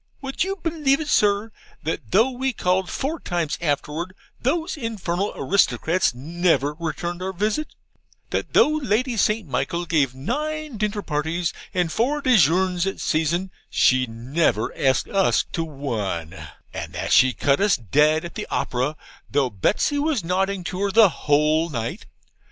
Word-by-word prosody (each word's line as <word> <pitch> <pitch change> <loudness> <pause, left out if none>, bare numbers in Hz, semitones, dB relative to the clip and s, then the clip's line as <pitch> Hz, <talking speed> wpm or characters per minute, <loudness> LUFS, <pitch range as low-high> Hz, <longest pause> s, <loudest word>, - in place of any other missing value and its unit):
Would 270 +3 -1
you 385 +1 -2
believe 310 -6 +1
it, 310 -2 -4
Sir, 210 -1 +2 0.3
that 155 -7 -3
though 225 - +4
we 260 +1 -2
called 185 -2 0
four 305 +5 -3
times 170 -4 -2
afterwards, 155 +3 -2 0.3
those 320 +7 0
infernal 205 - -2
aristocrats 185 -6 +1
never 155 +1 +1
returned 170 +2 -4
our 190 +1 -2
visit; 210 - -2 0.6
that - - -2
though - - +6
Lady 255 -4 0
St. 215 -2 +1
Michaels 140 +6 -2
gave 145 -6 +1
nine 300 - -3
dinner 210 -1 -2
parties 160 +3 -1 0.2
and 180 -3 0
four 270 - +1
DEJEUNERS 185 - +3
that 195 - -3
season, 170 +4 0 0.2
she 130 0 +3
never 125 +9 -1
asked 135 -2 +1
us 195 -2 +2
to 165 - -1
one; 110 - -4 0.4
and - - -6
that - - -3
she 130 0 +6
cut 140 +5 +1
us 205 -2 +3
dead 150 - +2
at 170 - -7
the - - -5
Opera, 130 +5 -1 0.3
though 135 -3 +1
Betsy 210 - +1
was 290 - 0
nodding 190 +2 0
to 180 +3 -4
her 200 - +1
the 215 0 +6
whole 155 +2 +2
night? 115 -5 -4
175 Hz, 150 wpm, -23 LUFS, 150-220 Hz, 0.6 s, though